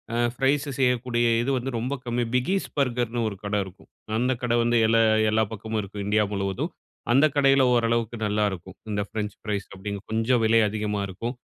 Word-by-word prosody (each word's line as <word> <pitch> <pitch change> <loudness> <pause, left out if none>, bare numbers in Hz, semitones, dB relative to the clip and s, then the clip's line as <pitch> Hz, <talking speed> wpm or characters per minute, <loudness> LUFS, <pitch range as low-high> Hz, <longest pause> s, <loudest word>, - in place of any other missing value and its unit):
ஆ, - - 0 0.2
fries 135 +3 +1
செய்யக்கூடிய 125 -2 +1 0.2
இது 120 - -1
வந்து 130 +1 -2
ரொம்ப 125 +4 -2
கம்மி. 120 0 -1
பிகீஸ் 185 +10 +1
பர்கர்ன்னு 120 -3 0
ஒரு 100 - -7
கட 105 0 -2
இருக்கும். 95 0 -14 0.3
அந்த 125 +3 +1
கட 120 -1 0
வந்து 120 0 +2
எல 115 +1 +3 0.3
எல்லா 110 +1 +3
பக்கமும் 110 0 -3
இருக்கும், 100 0 -6
இந்தியா 105 +1 +3
முழுவதும். 100 - -2 0.4
அந்த 135 +5 +6
கடையில 135 -1 +5
ஓரளவுக்கு 115 -1 +1
நல்லாயிருக்கும். 100 -3 -2
இந்த 105 0 0
ஃப்ரெஞ்ச் 105 -1 -4
ஃப்ரைஸ் 105 -3 -3
அப்பிடின்னு 100 +1 -6
கொஞ்சம் 115 +2 +2
விலை 115 +1 +5
அதிகமா 105 -1 -2
இருக்கும். 115 +6 -5
115 Hz, 175 wpm, -25 LUFS, 105-125 Hz, 0.4 s, அந்த